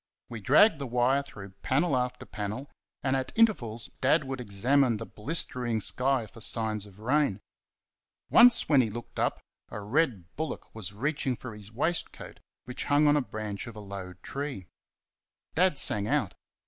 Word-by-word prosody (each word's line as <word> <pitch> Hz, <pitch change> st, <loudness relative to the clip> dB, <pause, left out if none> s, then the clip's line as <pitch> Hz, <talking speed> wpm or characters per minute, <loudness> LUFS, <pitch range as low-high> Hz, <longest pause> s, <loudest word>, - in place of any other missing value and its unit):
We 115 Hz, -2 st, -7 dB
dragged 150 Hz, -, +5 dB
the 140 Hz, -, -4 dB
wire 125 Hz, +3 st, +2 dB
through 100 Hz, -8 st, -10 dB
panel 140 Hz, +3 st, +1 dB
after 125 Hz, 0 st, -2 dB
panel, 110 Hz, +6 st, -5 dB, 0.3 s
and 135 Hz, 0 st, +1 dB
at 130 Hz, 0 st, -2 dB
intervals 120 Hz, -, +1 dB
Dad 145 Hz, +4 st, +3 dB
would 135 Hz, -1 st, -5 dB
examine 120 Hz, +4 st, +2 dB
the 115 Hz, -, -6 dB
blistering 120 Hz, -2 st, 0 dB
sky 125 Hz, +3 st, +1 dB
for 115 Hz, +2 st, -12 dB
signs 110 Hz, -2 st, 0 dB
of 100 Hz, -1 st, -17 dB
rain. 125 Hz, -1 st, +1 dB, 0.9 s
Once 235 Hz, -1 st, +7 dB
when 140 Hz, -4 st, +5 dB
he 115 Hz, -, -1 dB
looked 120 Hz, +3 st, -8 dB
up -, -, 0 dB, 0.3 s
a -, -, -6 dB
red 105 Hz, -, -1 dB
bullock 160 Hz, 0 st, -5 dB
was 105 Hz, -5 st, -6 dB
reaching 135 Hz, +4 st, -1 dB
for 120 Hz, -1 st, -9 dB
his 105 Hz, -1 st, -11 dB
waistcoat, 160 Hz, +9 st, -3 dB, 0.3 s
which 125 Hz, -, -5 dB
hung 145 Hz, +1 st, +3 dB
on 145 Hz, 0 st, +5 dB
a 145 Hz, -, +3 dB
branch 110 Hz, -3 st, -5 dB
of 115 Hz, -, -9 dB
a -, -, -8 dB
low 100 Hz, -3 st, -7 dB
tree. 140 Hz, -9 st, -5 dB, 0.9 s
Dad 180 Hz, -2 st, +3 dB
sang 105 Hz, -5 st, +1 dB
out. 130 Hz, -8 st, 0 dB
125 Hz, 165 wpm, -28 LUFS, 105-145 Hz, 0.9 s, Once